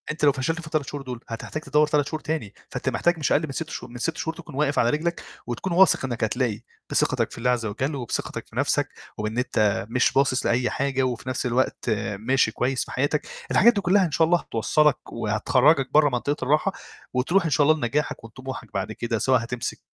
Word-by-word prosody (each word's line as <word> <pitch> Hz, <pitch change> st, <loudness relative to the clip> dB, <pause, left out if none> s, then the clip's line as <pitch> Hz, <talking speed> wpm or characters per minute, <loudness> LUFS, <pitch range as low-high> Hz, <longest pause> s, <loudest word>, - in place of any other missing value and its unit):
أنت 155 Hz, 0 st, -7 dB
لو 145 Hz, -, +7 dB
فشلت 150 Hz, +6 st, -2 dB
في 160 Hz, -, -10 dB
ال3 155 Hz, -4 st, -1 dB
شهور 145 Hz, -, -5 dB
دُول 125 Hz, -2 st, -6 dB
هتحتاج 115 Hz, +7 st, -5 dB
تدوّر 150 Hz, 0 st, +3 dB
3 145 Hz, -2 st, +1 dB
شهور 155 Hz, -, -3 dB
تاني، 150 Hz, -10 st, -3 dB, 0.2 s
فأنت -, -, -2 dB
محتاج 175 Hz, 0 st, +1 dB
مش 150 Hz, -, 0 dB
أقل 145 Hz, -, +4 dB
من -, -, -6 dB
6 155 Hz, +3 st, -4 dB
شهو -, -, -6 dB
من 120 Hz, -, -9 dB
6 160 Hz, +6 st, -2 dB
شهور 160 Hz, 0 st, -3 dB
تكون 150 Hz, -, -11 dB
واقف 145 Hz, 0 st, +1 dB
على 120 Hz, -, +4 dB
رجلك 165 Hz, +5 st, -1 dB, 0.2 s
وتكون 125 Hz, +10 st, -3 dB
واثق 180 Hz, -6 st, +5 dB
إنك 120 Hz, -4 st, -3 dB
هتلاقي 110 Hz, 0 st, 0 dB, 0.3 s
بثقتك -, -, +1 dB
في -, -, -10 dB
الله 120 Hz, +1 st, 0 dB
عز 120 Hz, -2 st, +1 dB
وجل 130 Hz, +8 st, -2 dB
وبثقتك 125 Hz, -4 st, -4 dB
في -, -, -18 dB
نَفْسك، -, -, +1 dB, 0.3 s
وبإن 110 Hz, +2 st, -3 dB
أنت 105 Hz, -6 st, +1 dB
مش 125 Hz, +2 st, +2 dB
باصص 135 Hz, -1 st, +2 dB
لأي 125 Hz, +1 st, +2 dB
حاجة 135 Hz, -1 st, 0 dB
وفي 125 Hz, 0 st, -2 dB
نَفْس 130 Hz, -, -2 dB
الوقت 125 Hz, 0 st, 0 dB, 0.3 s
ماشي 125 Hz, +1 st, +2 dB
كويس 130 Hz, +3 st, -1 dB
في -, -, -11 dB
حياتك، 145 Hz, +3 st, 0 dB, 0.2 s
الحاجات 235 Hz, +5 st, +6 dB
دي 205 Hz, -, -1 dB
كُلّها 190 Hz, +1 st, +4 dB
إن 165 Hz, -, -3 dB
شاء 160 Hz, -, +3 dB
الله 175 Hz, +1 st, +4 dB
هتوصّلك، 150 Hz, +6 st, +1 dB
وهتخرّجك 125 Hz, +6 st, +2 dB
برّه 150 Hz, -1 st, +6 dB
منطقة 140 Hz, +4 st, -2 dB
الراحة، 155 Hz, +7 st, +2 dB, 0.4 s
وتروح 160 Hz, +10 st, +2 dB
إن -, -, +1 dB
شاء 145 Hz, 0 st, +3 dB
الله 155 Hz, 0 st, +5 dB
لنجاحك 145 Hz, 0 st, -2 dB
وطموحك 130 Hz, +4 st, -8 dB
بعد 100 Hz, +2 st, -2 dB
كده، 115 Hz, +1 st, -2 dB
سواء 130 Hz, -1 st, +3 dB
هتمسك 120 Hz, +1 st, -4 dB
135 Hz, 215 wpm, -24 LUFS, 120-155 Hz, 0.4 s, لو